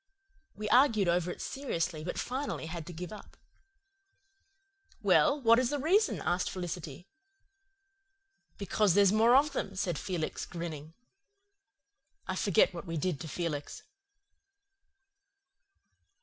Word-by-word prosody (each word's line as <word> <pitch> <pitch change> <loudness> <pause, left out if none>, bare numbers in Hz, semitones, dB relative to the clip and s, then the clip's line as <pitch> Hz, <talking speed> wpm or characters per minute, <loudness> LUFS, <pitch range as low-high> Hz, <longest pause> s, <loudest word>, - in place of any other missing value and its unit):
We 210 +1 -5
argued 230 -6 +4
over 175 0 +1
it - - -6
seriously, 175 - -3
but 175 - -4
finally 260 - -3
had 165 0 -6
to - - -7
give 175 +1 -7
it - - -6
up. - - -14 1.7
"Well, 295 -1 +4
what 230 -2 +5
is 255 -1 +1
the 290 - -1
reason?" 305 - +2
asked 175 +2 0
Felicity. 175 -3 -6 1.5
"Because 200 -2 +1
there's 200 -2 +5
more 225 +3 +5
of 290 +2 +4
them," 195 -7 -3
said 175 -4 -2
Felix, 175 -5 -3
grinning. 160 -2 -7 1.3
I 190 - -2
forget 190 -1 +3
what 175 +1 -8
we 165 0 -3
did 155 -1 -1
to 165 - -7
Felix. 150 -3 -4
185 Hz, 125 wpm, -30 LUFS, 170-230 Hz, 1.7 s, what